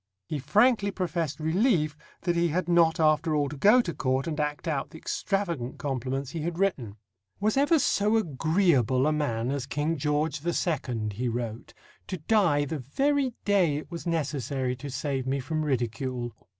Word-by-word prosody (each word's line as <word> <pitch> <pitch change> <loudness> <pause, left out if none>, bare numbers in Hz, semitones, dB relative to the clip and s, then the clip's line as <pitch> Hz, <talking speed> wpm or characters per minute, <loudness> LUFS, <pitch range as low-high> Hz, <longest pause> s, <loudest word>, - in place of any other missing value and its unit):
He 150 +8 -3
frankly 205 - +3
professed 170 -6 -2
relief 160 - +2 0.3
that 175 -1 0
he 170 0 +2
had 170 +2 -1
not 170 -2 +4
after 155 0 +3
all 145 -1 +1
to 150 - -7
go 210 - +6
to 175 -7 -4
Court 130 -1 0
and 155 -2 -3
act 150 +2 -2
out 145 -4 -1
the 160 - -11
extravagant 170 - -2
compliments 135 -1 -3
he 165 - -4
had 170 +2 -3
written. 140 - -1 0.4
"Was 210 +2 +1
ever 290 +4 +4
so 215 -5 +2
agreeable 155 - +2
a 155 - +3
man 130 -5 -1
as 140 -2 -3
King 150 +3 -1
George 150 +2 0
the 170 +4 -2
Second," 120 - -1
he 125 +5 -2
wrote, 115 -1 -5 0.3
"to 185 - -4
die 165 -4 +2
the 150 +2 -4
very 270 - 0
day 185 -8 +3
it 155 - -8
was 170 +1 -6
necessary 140 -5 -1
to 140 +2 -7
save 135 -1 -2
me 135 +1 0
from 155 +4 -2
ridicule?" 125 -3 -2
155 Hz, 175 wpm, -27 LUFS, 135-175 Hz, 0.4 s, go